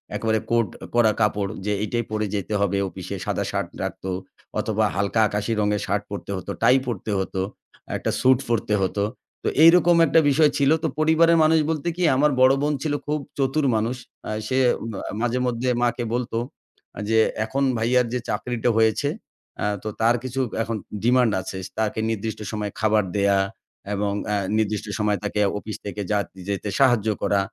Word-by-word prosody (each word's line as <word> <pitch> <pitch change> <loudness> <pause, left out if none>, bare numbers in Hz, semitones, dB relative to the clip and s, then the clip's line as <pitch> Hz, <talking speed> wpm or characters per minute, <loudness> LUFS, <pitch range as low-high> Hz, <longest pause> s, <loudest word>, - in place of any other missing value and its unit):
একেবারে 110 -1 +1
কোট 115 -2 +3 0.3
করা 115 -2 +5
কাপড় 105 -2 +1
যে 105 - 0
এইটাই 120 +2 -1
পরে 110 0 0
যেতে 100 0 -3
হবে, 100 -1 +1
অফিসে - - -7
সাদা - - -1
শার্ট - - -2
রাখতো 95 - -5 0.5
অথবা - - +1
হালকা 100 +3 0
আকাশি 105 +2 -2
রঙের 105 0 +1
শার্ট 100 +1 -1
পরতে 100 - -5
হতো 95 - -6
টাই 130 - +6
পরতে 110 -2 -3
হতো, 95 0 -2 0.6
একটা - - -2
স্যুট 130 -1 +4
পরতে 115 -2 0
হতো, 100 +2 0 0.4
তো - - -1 0.2
এইরকম 175 +1 +7
একটা 165 - +4
বিষয় 150 +2 +5
ছিল। 140 -1 +3
তো - - +2
পরিবারের 165 +2 +4
মানুষ 160 +1 +4
বলতে 160 0 -2
কি 180 - 0
আমার 150 +3 +3
বড়ো 130 +1 +6
বোন 150 +1 +1
ছিল 155 -2 -1
খুব 150 +1 0 0.2
চতুর 140 +2 +1
মানুষ 110 +3 0 0.3
আ - - -2 0.2
সে 130 - 0 0.3
ম - - -8 0.3
মাঝে 120 +1 0
মধ্যে 125 +1 -1
মাকে 120 0 +1
বলত 125 -1 -3 0.8
যে 110 0 +4 0.3
এখন 135 +5 -1
ভাইয়ার 125 +2 +2
যে 125 - 0
চাকরিটা 120 +3 -1
হয়েছে 110 -1 +2 0.7
তো, - - -5
তার 115 +2 +4
কিছু 130 +1 -4 0.2
এখন 115 -1 -3 0.3
ডিমান্ড 125 -1 +4
আছে। 95 +1 -6 0.2
তাকে 110 0 0
নির্দিষ্ট 110 0 -3
সময়ে 105 -2 -3
খাবার 110 -1 +3
দেয়া 100 -1 +3 0.6
এবং 100 0 -1 0.2
আ - - +2 0.2
নির্দিষ্ট 105 -1 0
সময়ে 105 -1 +1
তাকে - - -2 0.2
অফিস 105 0 -6
থেকে 105 0 -4
যা 105 - +3 0.3
যেতে 100 +1 -2
সাহায্য 120 -5 +4
করা। 100 0 +2
115 Hz, 170 wpm, -23 LUFS, 105-130 Hz, 0.8 s, এইরকম